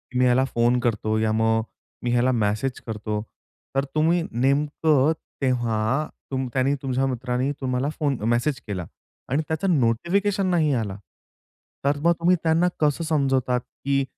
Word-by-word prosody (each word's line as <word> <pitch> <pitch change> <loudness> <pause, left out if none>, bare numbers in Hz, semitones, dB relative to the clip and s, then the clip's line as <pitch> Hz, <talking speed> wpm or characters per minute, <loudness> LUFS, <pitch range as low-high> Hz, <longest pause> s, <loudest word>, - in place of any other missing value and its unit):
मी 125 - +3
ह्याला 125 +1 +4
फोन 120 -1 +2
करतो, 110 -2 0
या 110 0 +1
मग 110 0 +2 0.4
मी 120 - 0
ह्याला 120 +2 +3
मेसेज 110 +3 0
करतो. 105 -1 -3 0.5
तर 135 +1 +2
तुम्ही 165 +2 +3
नेमकं 145 +3 +2 0.3
तेव्हा 120 +2 0 0.2
तुम 130 -1 -1
त्यांनी 135 +2 +2
तुमच्या 135 0 0
मित्राने 125 +1 -1
तुम्हाला 130 +2 0
फोन 140 -4 +1
मेसेज 130 +3 +1
केला 90 -4 -3 0.4
आणि 140 +4 +1
त्याचा 160 +5 -1
नोटिफिकेशन 180 - +1
नाही 155 -5 +2
आला. 105 -6 -2 0.9
तर 145 +1 +2
मग 170 - +5
तुम्ही 180 +2 +4
त्यांना 165 +2 +3
कसं 150 +2 +1
समजवतात, 135 -5 +1
की 140 +2 -2
130 Hz, 145 wpm, -24 LUFS, 120-150 Hz, 0.9 s, मग